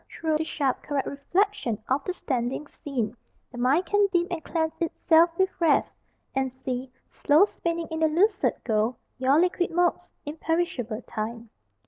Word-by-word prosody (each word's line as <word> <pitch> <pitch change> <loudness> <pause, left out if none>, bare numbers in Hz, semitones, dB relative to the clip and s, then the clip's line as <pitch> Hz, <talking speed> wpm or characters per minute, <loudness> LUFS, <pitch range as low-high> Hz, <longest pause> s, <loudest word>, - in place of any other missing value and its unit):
Through 315 -2 -1
the - - +1
sharp 280 -4 -1
Correct 285 -2 -2
reflection 350 - 0
of 270 +2 +1
the 365 - -2
standing 260 -3 -2
scene 245 -7 -4 0.4
The 245 - -8
mind 275 +9 +3
can 410 +3 +3
dip, 350 -1 +1
and 330 -3 -3
cleanse 320 0 -1
itself 330 0 +4
with 380 0 +2
rest, 320 -4 +3 0.4
And 265 -1 0
see, 255 0 -5 0.2
slow 305 +7 +4
spinning 335 -4 -3
in 320 - -2
the 320 - +4
lucid 390 +7 +2
gold, 220 +1 +1 0.2
Your 265 +4 +4
liquid 355 0 +1
motes, 350 +1 +1 0.2
imperishable 295 -7 -2
Time. 230 0 -5
305 Hz, 155 wpm, -26 LUFS, 255-345 Hz, 0.4 s, itself